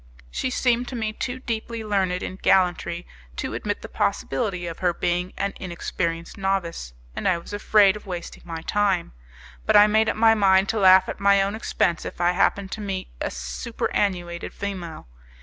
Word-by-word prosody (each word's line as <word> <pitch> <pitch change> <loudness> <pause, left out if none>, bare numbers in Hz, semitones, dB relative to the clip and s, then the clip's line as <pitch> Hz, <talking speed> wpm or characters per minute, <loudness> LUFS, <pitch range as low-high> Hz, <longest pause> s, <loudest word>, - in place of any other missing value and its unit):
She 255 - -2
seemed 250 -1 +1
to 255 - -6
me 220 -2 -2
too 245 +3 -4
deeply 230 -1 -4
learned 190 -4 0
in 185 - -5
gallantry 175 -2 +2 0.3
to - - -4
admit - - -3
the - - -6
possibility 175 +6 -1
of 170 -1 -6
her 175 -2 +1
being 180 +1 -1
an 200 0 -1
inexperienced 170 -1 -4
novice, 175 - -2 0.2
and - - -2
I 185 - +3
was 170 - -10
afraid 205 -1 +4
of 210 - -10
wasting 175 -2 -6
my 165 -2 -6
time; 195 -4 0 0.5
but - - +4
I 205 - +9
made 220 +1 +3
up - - -1
my 225 0 +6
mind 195 -2 +4
to 225 - 0
laugh 190 -1 +7
at - - -5
my 200 0 +5
own 200 +1 -2
expense 180 -6 0
if - - -7
I 175 0 +3
happened 195 +1 +1
to 220 - -5
meet 195 -2 -4
a - - -1
superannuated 170 - -3
female. 180 - -6
190 Hz, 185 wpm, -24 LUFS, 175-210 Hz, 0.5 s, I